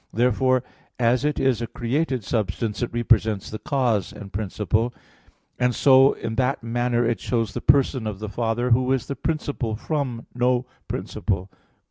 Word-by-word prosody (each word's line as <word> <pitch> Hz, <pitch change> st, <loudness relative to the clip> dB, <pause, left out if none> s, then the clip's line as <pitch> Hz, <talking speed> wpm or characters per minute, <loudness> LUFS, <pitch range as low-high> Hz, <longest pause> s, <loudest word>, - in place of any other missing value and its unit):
Therefore 130 Hz, +2 st, +2 dB, 0.3 s
as 120 Hz, +2 st, +2 dB
it 150 Hz, 0 st, 0 dB
is 130 Hz, -4 st, +2 dB
a 115 Hz, -, -2 dB
created 130 Hz, +1 st, -1 dB
substance, 105 Hz, +1 st, -2 dB
it 120 Hz, -, -1 dB
represents 110 Hz, -3 st, +1 dB
the 110 Hz, -, -5 dB
cause 125 Hz, -9 st, 0 dB
and 100 Hz, -2 st, -10 dB
principle; 110 Hz, +3 st, -1 dB, 0.6 s
and 125 Hz, -1 st, +2 dB
so 135 Hz, 0 st, +6 dB
in 110 Hz, -, -5 dB
that 130 Hz, 0 st, 0 dB
manner 120 Hz, +1 st, 0 dB
it 115 Hz, -3 st, 0 dB
shows 115 Hz, -2 st, -1 dB
the -, -, -4 dB
Person 130 Hz, -4 st, +3 dB
of 105 Hz, -3 st, -4 dB
the 110 Hz, +2 st, -5 dB
Father, 115 Hz, +3 st, -1 dB
Who 125 Hz, +2 st, +3 dB
is 130 Hz, -4 st, -1 dB
the 140 Hz, -, -4 dB
"principle 145 Hz, -9 st, -2 dB
from 130 Hz, -2 st, -3 dB
no 125 Hz, 0 st, +1 dB, 0.2 s
principle." 95 Hz, -1 st, -3 dB
120 Hz, 160 wpm, -24 LUFS, 110-130 Hz, 0.6 s, so